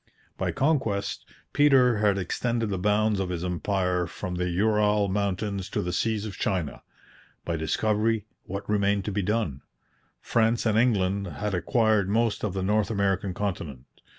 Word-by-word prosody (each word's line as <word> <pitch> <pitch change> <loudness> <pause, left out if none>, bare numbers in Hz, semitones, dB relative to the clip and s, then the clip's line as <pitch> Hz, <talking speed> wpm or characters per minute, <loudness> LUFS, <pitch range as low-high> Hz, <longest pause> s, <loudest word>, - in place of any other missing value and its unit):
By - - -2
conquest, 115 -9 0 0.3
Peter 130 -5 +5
had 105 -2 +3
extended 115 +4 -1
the 95 - -2
bounds 105 +1 +2
of 95 -2 -2
his 90 -1 -3
empire 90 0 0
from 90 +2 -6
the 90 0 -1
Ural 105 +2 +2
Mountains 100 0 -2
to - - -2
the 90 0 -3
seas 110 +2 0
of 100 -4 -7
China. 90 -8 -2 0.6
By 85 - -1
discovery, 105 +6 0 0.2
what 100 +2 -6
remained 100 -1 +1
to 105 - -2
be 100 +1 -1
done? 95 -9 -1 0.6
France 115 0 +1
and 110 -2 +2
England 100 -4 +2
had 95 +6 -4
acquired 110 0 +2
most 115 0 +1
of 105 -4 -1
the 95 - -1
North 105 0 +1
American 100 -3 0
continent. 85 -11 -4
100 Hz, 155 wpm, -26 LUFS, 90-110 Hz, 0.6 s, Peter